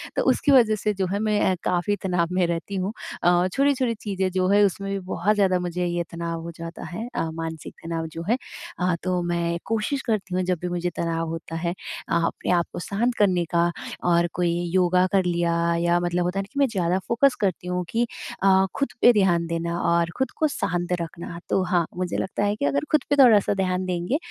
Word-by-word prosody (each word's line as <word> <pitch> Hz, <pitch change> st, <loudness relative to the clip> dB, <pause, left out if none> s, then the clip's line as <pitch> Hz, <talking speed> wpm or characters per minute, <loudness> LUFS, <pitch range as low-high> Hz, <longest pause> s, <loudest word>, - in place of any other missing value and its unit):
तो -, -, +1 dB
उसकी 285 Hz, -, +1 dB
वजह 230 Hz, -5 st, +6 dB
से 210 Hz, 0 st, -1 dB
जो 190 Hz, -1 st, -1 dB
है 200 Hz, -, 0 dB
मैं 210 Hz, -1 st, +1 dB
अ, -, -, +1 dB
काफ़ी 180 Hz, +3 st, +1 dB
तनाव 180 Hz, -3 st, +1 dB
में 180 Hz, -1 st, +2 dB
रहती 170 Hz, +4 st, -3 dB
हूँ। 190 Hz, +3 st, -2 dB, 0.3 s
अ, 175 Hz, +1 st, +4 dB
छोटी-छोटी 270 Hz, -4 st, +2 dB
चीज़ें 190 Hz, -2 st, -1 dB
जो 185 Hz, 0 st, +1 dB
है 205 Hz, +1 st, +5 dB
उसमें 195 Hz, +1 st, -2 dB
भी 195 Hz, -, -1 dB
बहुत 185 Hz, +3 st, 0 dB
ज़्यादा 190 Hz, -3 st, +3 dB
मुझे 180 Hz, 0 st, -2 dB
ये 175 Hz, 0 st, -1 dB
तनाव 170 Hz, -1 st, -4 dB
हो 170 Hz, +1 st, -6 dB
जाता 165 Hz, +1 st, -7 dB
है, 220 Hz, +8 st, -5 dB
अ, 165 Hz, -, -1 dB
मानसिक 160 Hz, -1 st, -6 dB
तनाव 165 Hz, -1 st, -3 dB
जो 165 Hz, -, -5 dB
है। 240 Hz, -, +3 dB, 0.4 s
अ, 180 Hz, -1 st, +1 dB
तो 180 Hz, -1 st, 0 dB
मैं 170 Hz, 0 st, -1 dB
कोशिश 225 Hz, +5 st, -1 dB
करती 205 Hz, -4 st, -1 dB
हूँ 185 Hz, -, +1 dB
जब 180 Hz, -1 st, 0 dB
भी 180 Hz, -, -2 dB
मुझे 175 Hz, 0 st, -1 dB
तनाव 165 Hz, -1 st, -1 dB
होता 165 Hz, 0 st, -6 dB
है 170 Hz, +1 st, -1 dB, 0.4 s
अ, -, -, -1 dB
आपने 170 Hz, +1 st, 0 dB
आप 175 Hz, -1 st, +3 dB
को -, -, -4 dB
शांत 230 Hz, +7 st, 0 dB
करने 185 Hz, -4 st, +3 dB
का 170 Hz, 0 st, +3 dB, 0.4 s
और 170 Hz, 0 st, +4 dB
कोई 175 Hz, -1 st, +1 dB, 0.2 s
योगा 180 Hz, 0 st, +4 dB
कर 195 Hz, -2 st, +3 dB
लिया 170 Hz, -1 st, +1 dB, 0.3 s
या 175 Hz, 0 st, +2 dB
मतलब 175 Hz, 0 st, 0 dB
होता 180 Hz, +2 st, -1 dB
है -, -, +1 dB
ना -, -, -12 dB
कि 280 Hz, -, -3 dB
मैं 275 Hz, -, +5 dB
ज़्यादा 185 Hz, -5 st, 0 dB
फ़ोकस 250 Hz, +3 st, +3 dB
करती 185 Hz, -2 st, -1 dB
हूँ 180 Hz, 0 st, -1 dB
कि 235 Hz, +1 st, +1 dB, 0.4 s
अ, 190 Hz, 0 st, +5 dB
खुद 275 Hz, -, 0 dB
पे 245 Hz, -, +8 dB
ध्यान 175 Hz, -5 st, +3 dB
देना 170 Hz, +1 st, -2 dB
और 170 Hz, 0 st, +2 dB
खुद 265 Hz, -, 0 dB
को 310 Hz, -, +3 dB
शांत 175 Hz, -, -2 dB
रखना। 170 Hz, +1 st, -7 dB
तो 195 Hz, -, +2 dB
हाँ, 180 Hz, -2 st, +1 dB
मुझे 180 Hz, -2 st, -2 dB
लगता 190 Hz, +2 st, -2 dB
है 205 Hz, +1 st, +1 dB
कि 140 Hz, -, -2 dB
अगर 140 Hz, 0 st, 0 dB
खुद 305 Hz, -, +3 dB
पे 285 Hz, -, +3 dB
थोड़ा-सा 215 Hz, -5 st, +5 dB
ध्यान 185 Hz, -1 st, -1 dB
देंगे 180 Hz, +8 st, -1 dB
180 Hz, 225 wpm, -24 LUFS, 170-205 Hz, 0.4 s, पे